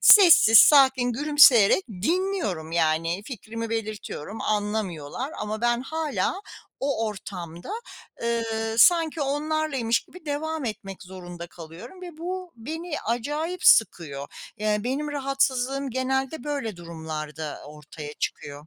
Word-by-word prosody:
Sessiz, 335 - +8
sakin, 265 -3 +6
gülümseyerek 290 - +5
dinliyorum, 220 - -2
yani, 165 +2 +1
fikrimi 230 -1 -6
belirtiyorum, 215 -3 -5
anlamıyorlar 205 -6 -2 0.4
ama 215 +1 -4
ben 240 0 +1
hâlâ 315 +4 -2 0.5
o 275 -5 0
ortamda, 180 -5 -7 0.5
ııı, 225 -1 -1
sanki 330 +1 +5
onlarlaymış 285 -4 0
gibi 365 -2 -16
devam 310 +1 -3
etmek 195 -4 -6
zorunda 175 -2 -9
kalıyorum 175 - -12
ve 345 -3 -9
bu 365 +1 -5
beni 320 +7 -5
acayip 295 +10 -3
sıkıyor. 150 - +3 0.3
Iıı, 210 0 0
benim 275 +4 -2
rahatsızlığım 275 -1 0
genelde 265 +2 -2
böyle 280 -9 -3
durumlarda 160 -3 -6
ortaya 150 0 -10
çıkıyor. 145 0 -5
230 Hz, 110 wpm, -25 LUFS, 180-290 Hz, 0.5 s, Sessiz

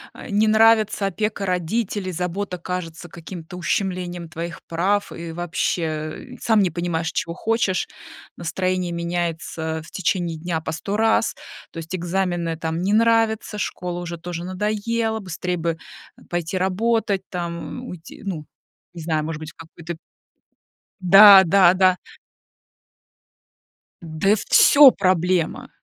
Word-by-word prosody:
э, - - -10
не 210 +2 +3
нравится 220 -1 +4
опека 205 +1 -2
родителей, 185 +2 -2
забота 180 +2 -3
кажется 175 -2 -6
каким-то 170 0 -10
ущемлением 180 -1 -2
твоих 170 +2 -6
прав, 195 +5 0
и 170 -1 -7
вообще, 175 +1 -2
э, 155 - -5
сам 220 -2 +3
не 185 -3 +1
понимаешь, 170 -2 -2
чего 170 0 -3
хочешь, 220 -4 0 0.5
настроение 185 +1 -2
меняется, 170 -2 -3
а, - - -5
в 160 - -15
течение 175 -2 -1
дня 165 0 -2
по 160 0 -5
100 195 +6 -3
раз, 225 0 +2 0.4
то - - -12
есть 165 +3 -5
экзамены 175 -2 -2
там 160 +1 -3
не 195 +3 0
нравятся, 225 -1 +2
школа 180 -2 -4
уже 170 -1 -6
тоже 170 0 -6
надоела, 215 +4 -1
быстрей 180 -1 -4
бы, 165 -1 -2 0.4
э, - - -19
пойти 175 +1 -2
работать, 200 +2 0
там, 170 -2 -4 0.2
м, 250 - -9
уйти, 170 -2 -11
ну 170 -6 -5 0.5
не 170 - -8
знаю, 155 -1 0
может 155 0 -4
быть, 155 0 -8
в - - -35
какой-то 165 +1 -9 1.0
Да 195 +1 +9
да 180 0 +5
да. 185 -1 +3 2.0
Да 165 +5 +1
всё 285 -2 +8
проблема! 185 -2 0
180 Hz, 135 wpm, -22 LUFS, 170-200 Hz, 2.0 s, Да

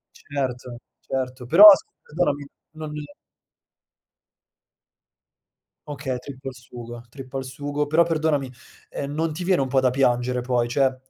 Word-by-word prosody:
Certo, 125 -3 -5 0.2
certo, 130 -1 -4
però 170 - +6
s - - -1 0.2
perdonami 145 -3 -1 0.3
non 155 -1 -8 3.0
Okay, 135 -3 -4
trippa 135 0 -8
al - - -11
sugo, 120 -1 -10
trippa 135 0 -8
al 135 - -3
sugo, 145 +3 -4
però 160 +3 +4
perdonami, 155 -5 -1 0.4
ehm, 140 0 -5
non 160 0 -1
ti 175 +3 -5
viene 185 -4 +2
un 135 - -1
po' 130 +1 +2
da 130 - +3
piangere 125 -1 +1
poi, 120 -1 0
cioè, 130 +1 +1
135 Hz, 135 wpm, -23 LUFS, 125-150 Hz, 3.0 s, però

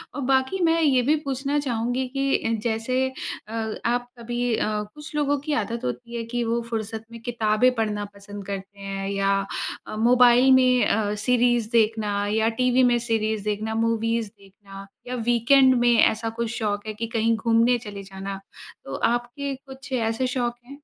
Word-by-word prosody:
और 290 - -3
बाकी 265 +8 +2
मैं 330 0 +3
ये 265 -5 +4
भी 310 - +5
पूछना 275 +2 -1
चाहूँगी 245 -1 -1
कि 275 0 +2
अ, 225 - +1
जैसे 225 +3 -1 0.5
अ 225 0 -3 0.3
आप 245 0 -2
कभी 240 0 -2
अ, - - 0 0.3
कुछ 300 0 -10
लोगों 290 -1 +1
की 300 - +1
आदत 235 0 -5
होती 235 - -5
है 230 - -3
कि 240 0 0
वो 235 +1 0
फ़ुर्सत 220 -1 -4
में 230 -1 -10
किताबें 230 0 +2
पढ़ना 210 -2 -1
पसंद 200 0 -9
करते 200 0 -6
हैं 195 0 -4
या 195 0 +1 0.6
अ, - - -6
मोबाइल 245 +3 +5
में 255 -1 +4
अ, 205 -1 +1
सीरीज़ 240 -2 +2
देखना 215 -3 +1
या 220 +1 +3
टीवी 250 +1 +4
में 240 - +3
सीरीज़ 220 -2 0
देखना 215 +1 -2
मूवीज़ 230 -1 0
देखना 195 0 -13 0.2
या 250 - -3
वीकेंड 240 +3 +4
में 240 0 +4
ऐसा 225 +1 +1
कुछ 235 -1 -1
शौक 205 -2 -2
है 215 - -3
कि 225 +2 -4
कहीं 230 0 +1
घूमने 230 +2 +3
चले 200 -1 -7
जाना 195 0 -7 0.5
तो 135 - -5 0.2
आपके 240 +4 -3
कुछ 270 +1 -13
ऐसे 230 +1 0
शौक 245 -1 -1
हैं। 275 - -11
230 Hz, 175 wpm, -24 LUFS, 215-250 Hz, 0.6 s, भी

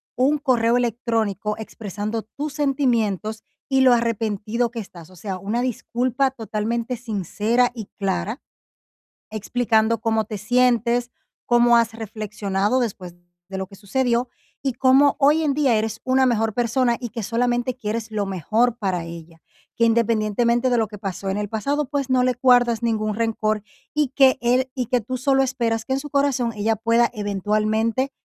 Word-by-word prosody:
un 275 +4 +2
correo 245 -4 +2
electrónico 225 -3 -1
expresando 215 0 -5
tus 285 +7 -6
sentimientos 235 - 0 0.3
y 265 -1 +3
lo 260 -1 +6
arrepentido 230 0 0
que 235 0 -6
estás. 175 -5 -10
O 185 - -16
sea, 185 +1 -5
una 210 +6 -2
disculpa 255 +2 0
totalmente 230 +1 -3
sincera 230 +2 0
y 220 -5 -7
clara, 195 - -2 0.9
explicando 220 +1 +1
cómo 220 -1 +1
te 215 0 -5
sientes, 245 +1 +2 0.3
cómo 240 0 +5
has 230 -1 +1
reflexionado 215 0 -2
después 190 -7 -4 0.3
de 190 - -6
lo 190 - -4
que 195 - -14
sucedió 240 +4 0 0.4
y 270 -2 0
cómo 265 +3 +4
hoy 300 +3 +4
en 290 -2 +1
día 275 -5 +2
eres 220 0 -2
una 260 0 +3
mejor 225 -3 +1
persona 240 0 +1
y 240 -1 -5
que 230 +1 -5
solamente 240 +2 0
quieres 225 -2 -4
lo 210 -2 -1
mejor 220 +6 0
para 185 -4 -1
ella, 165 -1 -11 0.3
que 230 - +3
independientemente 230 +2 +2
de 245 - +3
lo 220 - +1
que 210 0 -10
pasó 195 0 -4
en 190 - -1
el 210 0 -2
pasado, 280 +8 -1
pues, 280 -2 -2
no 255 -1 +3
le 255 0 +2
guardas 245 -3 +4
ningún 215 -2 0
rencor 215 -1 0 0.3
y 300 -3 +1
que 265 0 +4
él 250 +2 +2
y 250 -3 -2
que 250 - +2
tú 255 +5 -4
solo 270 +1 +2
esperas 235 -4 -1
que 265 - -1
en 265 - 0
su 295 +1 -8
corazón 275 -4 +1
ella 215 +1 0
pueda 230 +2 +2
eventualmente 215 +4 0
230 Hz, 165 wpm, -22 LUFS, 215-250 Hz, 0.9 s, lo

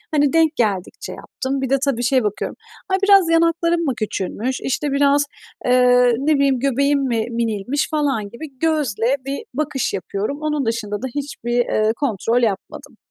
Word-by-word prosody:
Hani, 290 -1 +3
denk 325 -1 +3
geldikçe 200 -6 -2
yaptım, 270 +1 -4
bir 265 - -2
de, 275 - +3
tabii, 245 -4 0
şeye 255 0 +2
bakıyorum. 210 -1 -3 0.3
Ay, 380 - +2
biraz 395 -4 +6
yanaklarım 335 +1 +2
mı 270 - +1
küçülmüş; 215 +4 -3
işte, 285 +2 -1
biraz, 285 +1 +3 0.4
eee, 250 -1 +5
ne 300 +3 +2
bileyim 275 -2 +2
göbeğim 280 +2 +2
mi 230 -3 0
minilmiş 230 +4 -1
falan 275 -9 0
gibi 265 +3 -10
gözle 280 -6 +1
bir 275 +1 -4
bakış 290 -2 -1
yapıyorum. 200 - -3
Onun 300 -4 -1
dışında 215 -2 -2
da 260 - -2
hiçbir, 280 -4 -4
eee, 220 -2 +2
kontrol 240 -2 0
yapmadım. 200 -4 -3
265 Hz, 160 wpm, -20 LUFS, 230-290 Hz, 0.4 s, biraz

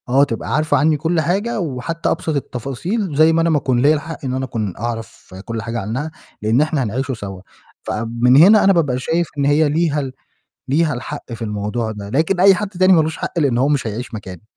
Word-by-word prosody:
آه، 135 +3 +4
تبقى 115 -6 -2
عارفة 155 -1 +2
عني 150 +2 +3
كل 160 +2 0
حاجة 205 +9 -1
وحتى 165 +1 -3
أبسط 160 - -2
التفاصيل، 145 - -3
زي 160 +2 +5
ما 165 - +2
أنا 165 - +2
ما 155 - +3
أكون 130 -3 0
ليّا 145 +3 +5
الحق 155 0 -6
إن 130 - -2
أنا 130 0 -2
أكون 110 -6 -3
أعرف 115 -4 -6
كل 115 -1 -4
حاجة 115 +1 -4
عنّها، 130 +10 -4 0.3
لإن 110 +5 +2
إحنا 155 -3 0
هنعيش 130 +5 -2
سوا، 100 -6 -6 0.4
فمن 120 +3 +1
هنا 200 +8 +7
أنا 195 - +5
بابقى 145 -8 +1
شايف 165 +5 0
إن 140 - +1
هي 145 +2 +3
ليها 155 0 +1
ال 135 -2 -4 0.6
ليها 150 +3 +2
الحق 130 +1 -7
في 115 0 -6
الموضوع 105 +2 -3
ده، 100 -1 -8
لكن 160 - 0
أي 195 +1 +7
حد 210 +2 -3
تاني 185 -1 +3
ما 170 - +6
لوش 160 +1 -3
حق - - -4
لإن 140 -6 +2
هو 135 +3 +2
مش 145 -4 0
هيعيش 115 +2 -5
مكاني، 95 -5 -8
140 Hz, 220 wpm, -19 LUFS, 120-160 Hz, 0.6 s, هنا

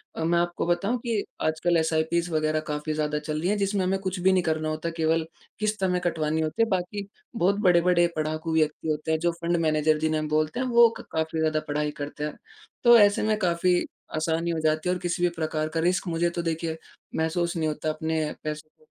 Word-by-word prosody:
अ, 160 - -3
मैं 170 +1 +2
आपको 175 0 -1
बताऊँ 195 +8 +1
कि 225 -3 0 0.2
आजकल 160 +2 +1
एसआईपीज़ 160 +2 +1
वग़ैरह 155 0 +1
काफ़ी 150 +1 -2
ज़्यादा 150 -1 -1
चल 155 0 -3
रही 175 +4 0
हैं 210 - +1
जिसमें 200 -1 0
हमें 190 +1 +1
कुछ 185 -1 -3
भी 190 +2 +4
नहीं 180 -2 +2
करना 155 -1 -1
होता, 155 +2 -3
केवल 165 0 0 0.3
किस्त 215 -2 -1
हमें 180 -1 +2
कटवानी 160 -2 0
होती 155 +9 -1
है - - +1
बाकी 195 +2 -2 0.3
बहुत 200 0 +2
बड़े-बड़े 175 -2 +4
पढ़ाकू 155 +1 -2
व्यक्ति 155 0 0
होते 155 +1 -1
हैं 160 - +1
जो 170 +1 +1
फँड 170 +1 +1
मैनेजर 155 0 +2
जिन्हें 155 0 +1
हम 155 - -3
बोलते 155 +8 0
हैं 255 - 0
वो 235 -1 +6
क - - -9
काफ़ी 160 0 -1
ज़्यादा 155 -1 +1
पढ़ाई 150 0 -1
करते 150 +1 -5
हैं 150 - -3 0.5
तो 240 -1 +8
ऐसे 205 0 +4
में 215 0 +1
काफ़ी 180 -1 +2 0.4
आसानी 165 +2 0
हो 160 - -1
जाती 155 +2 +1
है। 180 - +2
और - - -5
किसी 175 0 -1
भी 175 - +4
प्रकार 155 -1 -1
का 165 +1 -2
रिस्क 180 +3 +1
मुझे 170 +1 +1
तो 170 0 -3
देखिए 165 -1 -2 0.4
महसूस 170 +2 0
नहीं 160 -1 0
होता 155 +1 -2
अपने 160 0 -1 0.2
पैसों 155 0 -5
को 155 - -25
165 Hz, 220 wpm, -26 LUFS, 155-180 Hz, 0.5 s, तो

